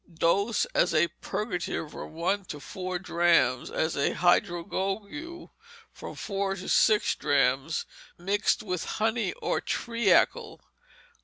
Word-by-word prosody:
Dose, 195 Hz, +7 st, +1 dB
as 175 Hz, -1 st, +2 dB
a 165 Hz, +2 st, +4 dB
purgative, 180 Hz, -7 st, -3 dB
from -, -, -9 dB, 0.2 s
two -, -, -21 dB
to 150 Hz, -, -7 dB
four 185 Hz, +4 st, -5 dB
drachms, 170 Hz, -8 st, +2 dB
as 160 Hz, +1 st, -1 dB
a 140 Hz, -, +1 dB
hydrogogue, 195 Hz, -, -1 dB, 0.4 s
from -, -, -9 dB
four 195 Hz, -1 st, -2 dB
to 185 Hz, -, -8 dB
six 215 Hz, -1 st, +4 dB
drachms, 135 Hz, +2 st, +1 dB, 0.3 s
mixed 200 Hz, +5 st, 0 dB
with 180 Hz, -4 st, -3 dB
honey 225 Hz, +2 st, 0 dB
or -, -, 0 dB
treacle. 235 Hz, -1 st, +1 dB
185 Hz, 120 wpm, -28 LUFS, 165-210 Hz, 0.4 s, a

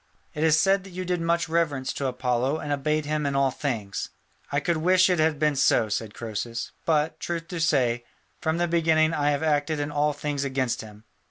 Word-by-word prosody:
It 150 Hz, -, -2 dB
is 160 Hz, -1 st, +5 dB
said 195 Hz, +1 st, +3 dB
that 195 Hz, -, -11 dB
you 185 Hz, 0 st, -5 dB
did 180 Hz, -1 st, -1 dB
much 170 Hz, 0 st, +1 dB
reverence 150 Hz, -5 st, 0 dB
to 140 Hz, -, -2 dB
Apollo 125 Hz, +2 st, 0 dB
and 150 Hz, -2 st, -5 dB
obeyed 150 Hz, +2 st, 0 dB
him 150 Hz, 0 st, -1 dB
in 140 Hz, -, -1 dB
all 135 Hz, -1 st, +3 dB
things." 115 Hz, -9 st, -3 dB, 0.4 s
"I 140 Hz, -, +2 dB
could 170 Hz, +2 st, 0 dB
wish 185 Hz, +3 st, +4 dB
it 180 Hz, -, +1 dB
had 155 Hz, -1 st, +2 dB
been 150 Hz, 0 st, +2 dB
so," 135 Hz, -5 st, +3 dB
said 105 Hz, 0 st, -3 dB
Croesus, 115 Hz, +1 st, -4 dB
"but, 155 Hz, 0 st, +1 dB
truth 170 Hz, -1 st, -4 dB
to 175 Hz, -3 st, -4 dB
say, 130 Hz, -7 st, +2 dB, 0.4 s
from 160 Hz, +1 st, 0 dB
the 175 Hz, 0 st, +1 dB
beginning 160 Hz, -1 st, +3 dB
I 145 Hz, -2 st, +1 dB
have 145 Hz, +1 st, 0 dB
acted 150 Hz, 0 st, +1 dB
in 145 Hz, 0 st, -2 dB
all 150 Hz, 0 st, +2 dB
things 145 Hz, -1 st, -3 dB
against 130 Hz, -3 st, -1 dB
him." 105 Hz, -1 st, -12 dB
150 Hz, 210 wpm, -26 LUFS, 135-165 Hz, 0.4 s, is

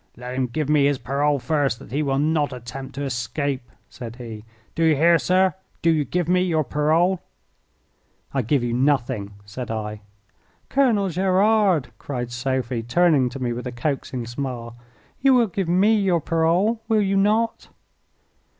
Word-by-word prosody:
"Let 125 Hz, +1 st, -7 dB
him 130 Hz, 0 st, 0 dB
give 150 Hz, +4 st, -2 dB
me 145 Hz, -2 st, +4 dB
his 145 Hz, -1 st, +1 dB
parole 140 Hz, +3 st, 0 dB
first 135 Hz, -1 st, 0 dB
that -, -, -14 dB
he 145 Hz, +4 st, 0 dB
will 135 Hz, -2 st, 0 dB
not 150 Hz, 0 st, +1 dB
attempt 125 Hz, +2 st, -8 dB
to 140 Hz, -, -3 dB
escape," 130 Hz, +1 st, -3 dB, 0.2 s
said 120 Hz, -2 st, -9 dB
he. 115 Hz, -3 st, -9 dB, 0.3 s
"Do 165 Hz, -, -1 dB
you 160 Hz, -1 st, +4 dB
hear, 165 Hz, +3 st, +4 dB
sir? 185 Hz, 0 st, +2 dB, 0.3 s
Do 165 Hz, -, +5 dB
you 155 Hz, -3 st, +1 dB
give 175 Hz, +5 st, -1 dB
me 180 Hz, +1 st, +3 dB
your 165 Hz, -4 st, +1 dB
parole?" 160 Hz, +6 st, +1 dB, 1.1 s
"I 135 Hz, -, +1 dB
give 125 Hz, +3 st, +1 dB
you 120 Hz, -1 st, -1 dB
nothing," 125 Hz, -6 st, 0 dB
said 120 Hz, +4 st, -7 dB
I. 105 Hz, -1 st, -4 dB, 0.7 s
"Colonel 230 Hz, -8 st, +2 dB
Gerard," 190 Hz, -2 st, +2 dB
cried 125 Hz, -4 st, -4 dB
Sophie, 125 Hz, -1 st, -2 dB
turning 140 Hz, +1 st, +3 dB
to 125 Hz, -, -8 dB
me 125 Hz, -2 st, -2 dB
with 125 Hz, +2 st, -5 dB
a -, -, -4 dB
coaxing 130 Hz, -1 st, -3 dB
smile, 120 Hz, -1 st, -5 dB, 0.5 s
"you 270 Hz, -1 st, +5 dB
will 240 Hz, -2 st, +5 dB
give 190 Hz, -3 st, -3 dB
me 195 Hz, +5 st, +4 dB
your 185 Hz, -4 st, +2 dB
parole, 170 Hz, +8 st, +1 dB
will 220 Hz, -2 st, +3 dB
you 195 Hz, 0 st, 0 dB
not?" 215 Hz, +4 st, +1 dB
145 Hz, 170 wpm, -23 LUFS, 125-180 Hz, 1.1 s, Do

